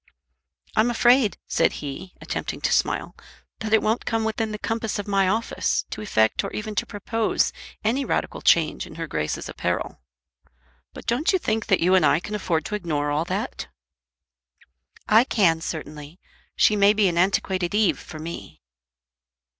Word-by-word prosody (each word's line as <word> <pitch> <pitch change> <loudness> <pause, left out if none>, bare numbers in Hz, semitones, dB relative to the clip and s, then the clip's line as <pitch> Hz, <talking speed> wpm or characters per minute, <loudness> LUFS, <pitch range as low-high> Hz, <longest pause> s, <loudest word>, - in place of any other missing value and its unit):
"I'm 220 +3 +4
afraid," 240 -3 +4
said - - +2
he, 150 +6 -7
attempting - - -4
to - - 0
smile, - - 0 0.4
"that 220 -1 -4
it 220 - +4
won't 220 +2 +1
come 225 -1 -1
within 220 0 -1
the 210 - -4
compass 225 0 -2
of 205 - -5
my 195 -2 +2
office 220 +4 0
to - - -5
effect 110 - +2
or - - -4
even 215 0 -4
to - - -1
propose 220 +2 0 0.3
any 240 +6 +1
radical - - -2
change 160 -2 +3
in - - -12
her 165 0 -4
Grace's 75 - -3
apparel. - - -3 0.9
But - - -11
don't 245 +10 +1
you 380 - +3
think 220 -10 -2
that 195 -4 +3
you 180 +2 +3
and 190 - +5
I 155 - +4
can 205 +4 -7
afford 170 -6 -1
to 210 - -3
ignore 150 -7 -1
all 150 +3 0
that?" - - -4 1.4
"I 220 +2 +6
can 175 -10 +2
certainly. 155 +1 -7 0.4
She 215 - +4
may 200 0 +5
be 210 -2 +3
an 170 -1 0
antiquated 185 0 +1
Eve 210 -3 +2
for 155 - -10
me." 155 - -8
200 Hz, 170 wpm, -24 LUFS, 165-220 Hz, 1.4 s, I